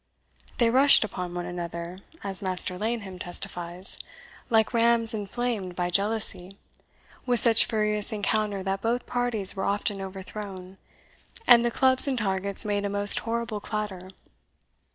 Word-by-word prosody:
They 235 -2 +2
rushed 275 +1 +6
upon 180 -4 -6
one 175 0 -4
another, 175 0 -6 0.2
as 195 -2 -2
Master 185 -1 -4
Laneham 205 -2 -4
testifies, 175 0 -4 0.5
like 225 0 +2
rams 230 0 +3
inflamed 210 -2 -4
by 175 0 -2
jealousy, 200 -1 -1 0.7
with 245 -1 +6
such 230 0 +8
furious 210 -1 0
encounter 210 -1 -2
that 195 +1 -3
both 240 +2 -2
parties 240 -6 0
were 190 - -4
often 200 0 -2
overthrown, 190 0 -8 0.7
and 235 -1 +7
the 240 - +1
clubs 260 +3 +5
and 265 -2 -1
targets 200 -1 -2
made 205 -1 -1
a 200 - -2
most 205 0 +4
horrible 230 -2 -4
clatter. 205 -3 -6
205 Hz, 135 wpm, -26 LUFS, 185-230 Hz, 0.7 s, such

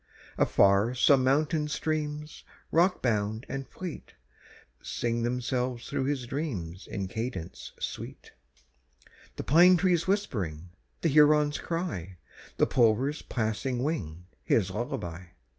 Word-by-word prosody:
Afar 100 +5 +3
some 130 +1 +5
mountain 150 +3 +2
streams, 150 0 -3 0.3
rockbound 115 - +1
and 135 -1 -5
fleet, 180 -4 -8 0.7
Sing 120 0 -2
themselves 125 0 -2
through 130 - -1
his 135 -3 -1
dreams 105 - -4
in 95 -1 -4
cadence 95 -5 -5
sweet, - - -6 1.0
The - - -5
pine 175 +5 +6
trees 175 -2 +2
whispering, 90 - -2 0.3
the 165 - +2
heron's 150 0 +4
cry, 155 - -4 0.4
The - - +4
plover's 125 +5 +2
passing 120 +2 -2
wing, 90 - -3 0.2
his 95 -4 +2
lullaby. 105 - -4
130 Hz, 110 wpm, -28 LUFS, 105-150 Hz, 1.0 s, pine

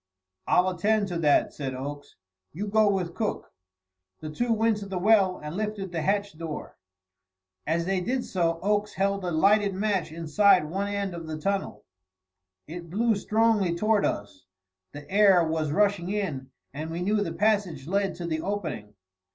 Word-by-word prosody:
"I'll 180 +1 +4
attend 205 +3 +1
to 175 -2 -3
that," 150 -3 +3
said 135 -3 -4
Oakes. 145 +2 -7 0.4
"You 195 +7 -4
go 215 0 +3
with 185 -4 -1
Cook." 210 +3 -3 0.7
The 155 - -7
two 240 +9 -1
went 225 -1 +2
to 205 -1 -7
the 195 -1 -4
well 195 -1 +4
and 150 +2 -7
lifted 210 -2 -3
the 165 -2 -2
hatch 200 +2 0
door. 160 -2 -6 0.9
As 165 +2 0
they 190 0 0
did 250 +6 -1
so, 165 -3 0
Oakes 210 +1 0
held 200 0 0
a 180 - -1
lighted 200 +4 +3
match 195 -5 -1
inside 170 +3 +3
one 195 +5 -2
end 200 -2 -2
of 165 -2 -7
the 155 -1 -4
tunnel. 195 +3 -2 0.8
It 170 +2 -8
blew 225 +6 +2
strongly 210 -3 +2
toward 215 +3 +2
us; 100 -2 -3 0.4
the 145 0 -10
air 195 -2 +5
was 160 -1 -1
rushing 200 -1 +1
in, 165 -11 -3 0.2
and 155 +3 -5
we 170 +2 -3
knew 210 +3 +1
the 205 - -1
passage 200 -10 0
led 195 +1 0
to 175 0 -6
the 160 -1 -2
opening. 150 - -4
190 Hz, 170 wpm, -26 LUFS, 160-205 Hz, 0.9 s, air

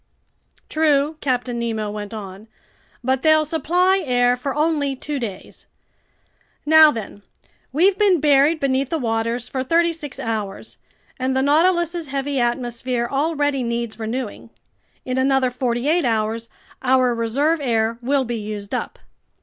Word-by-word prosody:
"True," 305 -1 +1
Captain 250 -2 -1
Nemo 220 -3 -2
went 205 -1 -6
on, 205 -1 -8 0.6
"but 260 +1 0
they'll 310 0 +4
supply 360 +5 +2
air 245 -3 +2
for 265 +2 -4
only 295 -3 0
two 290 +2 -4
days. 205 -6 -8 1.0
Now 315 0 +8
then, 215 -5 -6 0.5
we've 370 +8 +3
been 395 -5 +4
buried 295 +2 +4
beneath 270 -1 0
the 325 - -1
waters 230 -1 -2
for 260 -1 -3
thirty 335 +4 +2
six 295 -5 -7
hours, 215 -4 -4 0.4
and 260 +1 0
the 265 - +2
Nautilus's 340 +2 +2
heavy 275 0 -2
atmosphere 240 0 -1
already 290 -1 0
needs 235 -1 -3
renewing. 230 0 -5 0.6
In 255 0 -1
another 265 -1 +2
forty 245 0 -2
eight 335 +2 +2
hours, 225 -1 -1 0.3
our 255 -1 +3
reserve 275 +8 0
air 230 -3 0
will 270 +2 +1
be 240 0 -3
used 210 -1 -6
up." - - -3
260 Hz, 140 wpm, -21 LUFS, 235-300 Hz, 1.0 s, Now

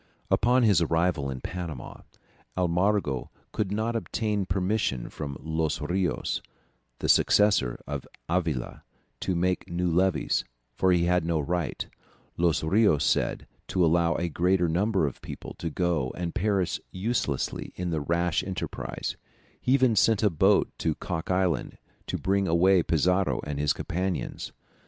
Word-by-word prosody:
] - - -33
Upon 125 +2 +4
his 105 -6 +5
arrival 80 -3 +1
in 65 -1 -5
Panama, 85 -7 -6 0.6
Almagro 90 -5 +1 0.2
could 100 -3 -2
not 110 +3 -1
obtain 105 -1 -1
permission 95 - -1
from 70 -3 -5
Los 80 -1 -1
Rios, 90 +3 -1 0.6
the - - -3
successor 105 -13 +4
of 70 -2 -5 0.2
Avila, 80 -8 -1 0.4
to 95 - -1
make 90 +2 0
new 85 0 0
levies, 90 0 +2 0.3
for 95 - +2
he 90 -1 +3
had 90 0 +2
no 85 -1 0
right, 85 +2 -2 0.5
Los 85 -2 +1
Rios 80 -4 +3
said, - - +1 0.2
to 90 -2 +2
allow 85 +1 +3
a 85 - -1
greater 90 +2 +2
number 95 +2 +1
of 70 - -5
people - - -8
to 85 - -2
go 80 -6 0
and 85 -1 -3
perish 100 -4 0
uselessly 95 - -2
in 90 -2 -3
a 80 - 0
rash 85 +3 0
enterprise; 95 -1 -4 0.4
he 125 - +2
even 130 -4 +4
sent 110 +1 +3
a 105 - +4
boat 95 +6 +3
to 80 -2 0
Cock 85 -1 -4
Island 90 -7 0 0.3
to - - -2
bring 100 0 +1
away 90 +3 +4
Pizarro 90 +4 +1
and 75 -1 -4
his 75 -1 +2
companions. 90 +2 -3
90 Hz, 145 wpm, -27 LUFS, 80-95 Hz, 0.6 s, his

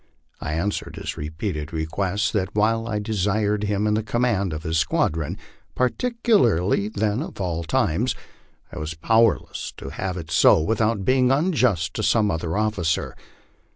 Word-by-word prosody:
I 75 - -4
answered 100 +5 -2
his - - -5
repeated 80 0 -4
request, 95 +6 -1
that 100 -1 -1
while 115 +2 +2
I 110 -2 -1
de 105 +1 -3
sired 105 +1 +1
him 105 0 0
in 105 +1 +2
command 110 -4 0
of 75 +1 -5
his 80 -1 0
squadron, 80 -1 0 0.4
particularly 125 - +2
the* 105 +1 -1
of - - -9
all 85 -3 -2
times, 85 +9 0 0.6
1 - - -7
was 75 +1 -4
powerless 110 +6 +1
to - - -7
have 95 -1 -4
it 80 -2 -7
so - - +6
without 110 +3 0
being 130 -1 +3
unjust 125 - +1
to - - -3
some 105 -1 +2
other 80 +3 -2
officer. 105 -7 0
105 Hz, 155 wpm, -23 LUFS, 85-110 Hz, 0.6 s, so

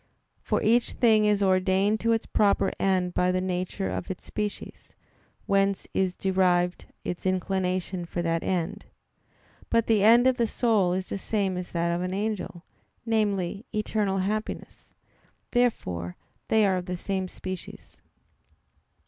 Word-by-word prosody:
For - - -1
each 235 +2 +3
thing 220 -3 +4
is 205 -1 +3
ordained 190 +2 +2
to 230 +1 +1
its 225 -1 +1
proper 205 -1 +2
end 185 -2 +1
by 180 0 +2
the 185 - +1
nature 185 +1 -2
of - - -4
its 190 - -5
species, 210 -1 -5 0.5
whence 195 0 +1
is 185 -1 0
derived 180 -2 +1 0.2
its 175 - -4
inclination 185 -1 -1
for 175 0 -3
that 165 0 0
end. 190 +3 -2 0.8
But 230 -1 +2
the 215 -3 +3
end 235 +3 +7
of 260 -1 +4
the 235 - +2
soul 215 -7 +2
is 185 0 -3
the 195 - -3
same 195 -2 -1
as 180 0 -5
that 170 0 0
of 170 +1 -1
an 180 +1 -2
angel 205 -4 -3 0.4
namely, 210 -1 0
eternal 210 -2 0
happiness. 210 +3 -4 0.6
Therefore 90 - 0 0.3
they 220 -1 +4
are 190 -2 +2
of 180 0 -5
the 180 0 -3
same 190 +1 -2
species. 185 0 -8
190 Hz, 150 wpm, -27 LUFS, 180-215 Hz, 0.8 s, end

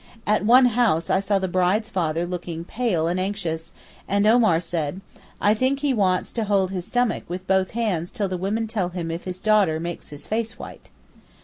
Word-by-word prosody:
At 210 0 +2
one 250 +4 +7
house 225 -9 +2
I - - +3
saw 200 +1 +1
the 190 -1 -1
bride's 185 +4 +1
father 170 -5 -1
looking 175 -2 -5
pale 190 -8 0
and 175 +2 0
anxious, 185 -5 -3 0.4
and 200 +1 +2
Omar 220 -7 +5
said, 165 -1 -3 0.4
'I 205 - +4
think 260 +5 0
he 285 -2 +1
wants 185 -5 +1
to 225 -2 -1
hold 195 -2 +1
his 185 -2 -4
stomach 245 -1 0
with 180 +2 -6
both 190 0 +2
hands 180 -7 -1
till 210 -5 -2
the 185 - -3
women 200 +5 -1
tell 210 -5 -2
him 175 -2 -4
if 165 +1 -5
his 185 -1 -5
daughter 200 -7 +3
makes 170 +1 -6
his 145 0 -9
face 225 +1 -2
white. - - -11
190 Hz, 200 wpm, -23 LUFS, 175-220 Hz, 0.4 s, one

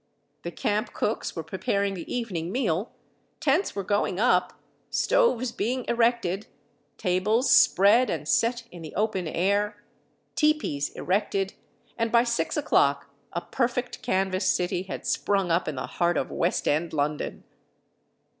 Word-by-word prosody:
The 170 - -4
camp 210 +5 -2
cooks 215 - -2
were 165 - -4
preparing 195 +4 -1
the 175 -4 -7
evening 185 -9 -3
meal, 205 -4 -1 0.5
tents 310 +7 +1
were 200 - -2
going 200 -1 0
up, 180 -6 +2 0.3
stoves 255 - +2
being 245 +2 -2
erected, 230 -5 +1 0.5
tables 210 +7 +1
spread 210 +7 +5
and 150 -2 -3
set 235 +8 +1
in 175 - -10
the 155 - -9
open 200 -4 0
air, 205 +5 0 0.5
tepees 300 - +1
erected, 195 0 -1 0.5
and 230 0 0
by 235 0 +5
6 235 +4 -1
o'clock 140 - +2 0.2
a 170 - -3
perfect 245 +2 -2
canvas 190 -4 0
city 180 0 +1
had 190 0 -7
sprung 195 -3 0
up 170 +2 +1
in 155 - -2
the 130 - -3
heart 175 0 0
of - - -2
West 170 - 0
End 160 +3 0
London. 150 0 -2
200 Hz, 140 wpm, -26 LUFS, 175-235 Hz, 0.5 s, spread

